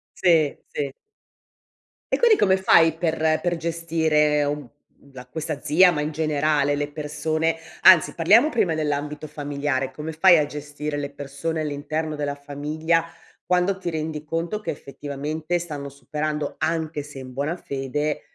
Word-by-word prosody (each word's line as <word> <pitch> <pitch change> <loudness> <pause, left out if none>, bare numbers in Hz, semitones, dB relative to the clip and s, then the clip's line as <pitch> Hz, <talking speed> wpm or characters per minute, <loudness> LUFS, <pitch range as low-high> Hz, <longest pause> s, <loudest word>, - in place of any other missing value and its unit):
Sì, 160 -5 +3
sì. 140 -2 -4 1.2
E - - +4
quindi 465 -3 +5
come 190 -1 +4
fai 165 -4 +5
per 165 -1 -1 0.2
per 175 -1 0
gestire 160 -3 +1
uhm, 145 +1 -1 0.4
uhm, 140 - -21
la 125 -1 -10
questa 155 +2 -5
zia, 165 +5 +5
ma 155 - -2
in 150 - -2
generale 150 -2 +1
le 145 0 -3
persone 155 +2 -1 0.3
anzi, 180 -4 +7
parliamo 210 - +5
prima 185 - +1
dell'ambito 150 0 -2
familiare. 145 -2 -2
Come 150 +4 -6
fai 170 +2 +6
a 150 - +2
gestire 145 0 -5
le 140 -1 -3
persone 145 +3 -4
all'interno 155 +1 -3
della 145 -1 -2
famiglia 150 +3 -1 0.4
quando 180 +2 +2
ti 175 - -3
rendi 155 -1 -4
conto 165 +7 -3
che, 215 - -6
effettivamente, 150 +4 -4
stanno 150 -5 -6
superando, 150 +2 -3
anche 160 -2 -1
se 145 -1 -11
in 130 -1 -8
buona 145 +7 -2
fede, 145 +2 -3
150 Hz, 150 wpm, -23 LUFS, 145-165 Hz, 1.2 s, anzi